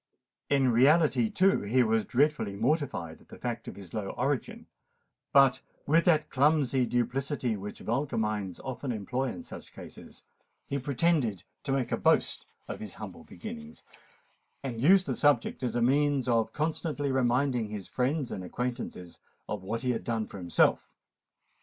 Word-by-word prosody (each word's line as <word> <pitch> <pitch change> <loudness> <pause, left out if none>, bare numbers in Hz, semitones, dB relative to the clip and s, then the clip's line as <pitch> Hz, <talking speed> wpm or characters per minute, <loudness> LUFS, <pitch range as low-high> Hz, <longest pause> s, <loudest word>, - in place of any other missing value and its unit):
In 135 -3 +3
reality, 135 -1 +4
too, 195 - +3
he 120 +5 +3
was 110 -2 +1
dreadfully 140 -6 +1
mortified 125 - -1
at - - -21
the - - -12
fact 120 -1 -4
of - - -7
his 95 -4 -11
low 105 -3 -3
origin; - - -2 0.7
but, 135 -2 +5 0.2
with 165 +3 +3
that 155 -3 +3
clumsy 135 -3 +3
duplicity 125 0 -1
which 105 +1 -7
vulgar 135 +6 -1
minds 105 -4 -2
often 130 0 -4
employ 125 +4 -2
in 130 - -5
such - - -10
cases, - - -12 0.4
he 140 - -2
pretended 135 - +1 0.2
to 135 - -1
make 130 -3 0
a - - +1
boast - - +1 0.2
of - - -6
his - - -7
humble - - -9
beginning, 75 +1 -9 0.9
and 120 -4 -4
used 185 +6 +6
the - - -1
subject 145 -5 +2
as 125 -2 -2
a 120 - +2
means 140 0 +2
of 115 -2 +2
constantly 150 -2 -2
reminding 125 -2 +1
his 105 -4 -6
friends 130 +2 -1
and 95 - -5
acquaintances 120 -4 -5 0.3
of 105 - -4
what 110 +6 -4
he 125 - +1
had 120 - -3
done 115 -2 -1
for 100 - -10
himself. 85 -2 +1
125 Hz, 160 wpm, -29 LUFS, 110-140 Hz, 0.9 s, used